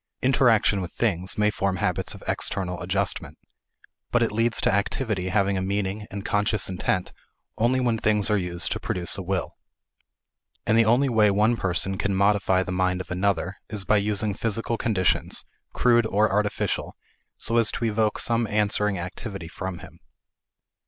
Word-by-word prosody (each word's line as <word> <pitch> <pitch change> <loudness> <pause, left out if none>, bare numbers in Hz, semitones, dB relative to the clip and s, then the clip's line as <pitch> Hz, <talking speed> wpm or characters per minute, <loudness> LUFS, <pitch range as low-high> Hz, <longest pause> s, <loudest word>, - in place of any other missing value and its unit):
Interaction 115 -6 +3
with 90 -2 -6
things 95 -5 +1
may 105 0 +2
form 100 -2 -1
habits 90 - -1
of - - -13
external 90 -2 -1
adjustment. 95 +2 -2 0.7
But 120 -1 +3
it 115 - 0
leads 115 +2 +1
to - - +2
activity 100 -1 -1
having 100 0 +1
a - - -1
meaning 100 +2 -2
and 100 +1 -7
conscious 105 0 0
intent 90 -1 -2 0.4
only 120 +3 +1
when 120 -3 0
things 105 -2 +2
are - - +4
used 90 -1 -3
to - - -2
produce 90 -1 +1
a 100 - -3
result. 95 0 -3 1.1
And 110 - +2
the 115 0 +5
only 120 +5 +3
way 110 -4 +3
one 105 +4 +2
person 95 -1 0
can 100 -1 0
modify 100 -1 +2
the 90 - -6
mind 90 0 0
of 90 - -8
another 95 0 -1
is 105 -3 0
by 105 - +3
using 105 0 0
physical 115 +3 -2
conditions, 100 -6 0 0.3
crude 120 -2 +3
or 105 0 +2
artificial, 105 +1 -1 0.4
so 115 - 0
as 115 -2 +4
to 115 - -2
evoke 110 -1 0
some 115 -1 +1
answering 105 -1 +1
activity 90 +1 -6
from 95 +2 -6
him. - - -17
100 Hz, 165 wpm, -25 LUFS, 95-110 Hz, 1.1 s, the